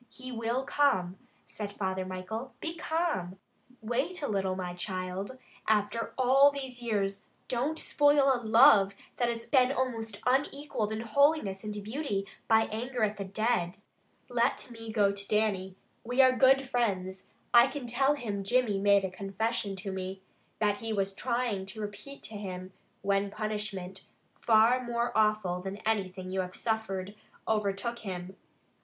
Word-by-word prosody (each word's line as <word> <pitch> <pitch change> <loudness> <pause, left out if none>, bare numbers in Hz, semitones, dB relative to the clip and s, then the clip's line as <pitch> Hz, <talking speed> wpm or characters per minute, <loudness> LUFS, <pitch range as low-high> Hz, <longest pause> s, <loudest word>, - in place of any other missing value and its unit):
"He 255 0 -9
will 235 +2 -1
come," 195 -11 +1 0.3
said 210 -2 -6
Father 190 -2 -2
Michael. 220 +7 -6
"Be 330 - -3
calm! 315 - -1 0.4
Wait 265 +10 -2
a - - 0
little, 190 -2 0
my 180 -1 -4
child. 185 +5 -4 0.3
After 215 +1 0
all 265 +2 +6
these 265 -3 -5
years, 200 -3 -1 0.2
don't 265 +6 -1
spoil 290 -3 +4
a 245 - -2
love 220 -4 +6 0.2
that 240 -1 +1
has 230 -1 -3
been 255 -2 +4
almost 230 -6 -2
unequaled 270 -3 0
in 220 0 -2
holiness 235 -4 +2
and 210 -1 -5
beauty, 215 -3 -2 0.2
by 220 0 +5
anger 240 +2 -2
at 210 -1 0
the 200 - -3
dead. 200 -2 0 0.5
Let 245 +1 0
me 225 -1 -8
go 205 -3 +3
to 200 0 -4
Dannie. 200 -3 0 0.3
We 245 +3 -3
are 260 -1 +8
good 270 +1 +5
friends. 195 -7 -1 0.3
I 240 +1 +8
can 285 -3 -6
tell 270 +4 +2
him 210 -7 -4
Jimmy 230 -2 +2
made 200 -1 +4
a 190 - -4
confession 200 +2 -2
to 195 +1 -5
me, 190 0 -5 0.3
that 205 -1 +1
he 225 +1 -4
was 195 -2 0
trying 235 -4 -1
to 195 +3 -6
repeat 210 +7 -8
to - - -7
him, 185 -2 -6 0.3
when 200 0 +1
punishment, 210 -3 -4 0.3
far 230 +3 +4
more 235 0 -1
awful 215 -5 +2
than 190 +1 -5
anything 190 -4 -1
you 190 0 0
have 180 0 -6
suffered, 205 -4 -2 0.3
overtook 215 +2 -1
him. 185 -2 -6
215 Hz, 155 wpm, -30 LUFS, 195-245 Hz, 0.5 s, are